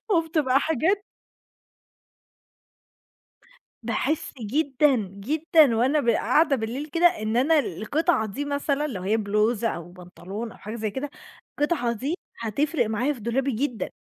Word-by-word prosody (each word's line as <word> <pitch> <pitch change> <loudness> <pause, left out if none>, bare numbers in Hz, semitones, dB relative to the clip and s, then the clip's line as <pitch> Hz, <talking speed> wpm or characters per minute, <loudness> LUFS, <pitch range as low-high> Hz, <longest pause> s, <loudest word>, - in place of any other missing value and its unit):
وبتبقى 315 -7 +2
حاجات 325 +7 +1 2.8
باحس 265 +8 -1
جدًا، 275 +4 +2 0.2
جدًا 295 +5 +3
وأنا 260 +7 +2
ب 240 - +1
قاعدة 275 +6 +3
بالليل 240 +4 -4
كده، 340 +3 +1
إن 225 -10 -2
أنا 300 +5 +4
القطعة 245 - 0
دي 215 +8 -4
مثلًا 285 +1 -1
لو 210 -10 -5
هي 205 +4 +1
بلوزة، 215 +2 +1
أو 170 -2 -6
بنطلون، 185 +5 -8
أو - - -14
حاجة 215 +2 -7
زي 215 -2 -3
كده. 270 +6 -4 0.5
القطعة 290 -6 +1
دي 270 +9 -2 0.2
هتفرق 255 +5 0
معايا 240 +7 0
في 260 - -12
دولابي 250 +5 0
جدًا. 245 -1 -2
255 Hz, 135 wpm, -25 LUFS, 220-300 Hz, 2.8 s, أنا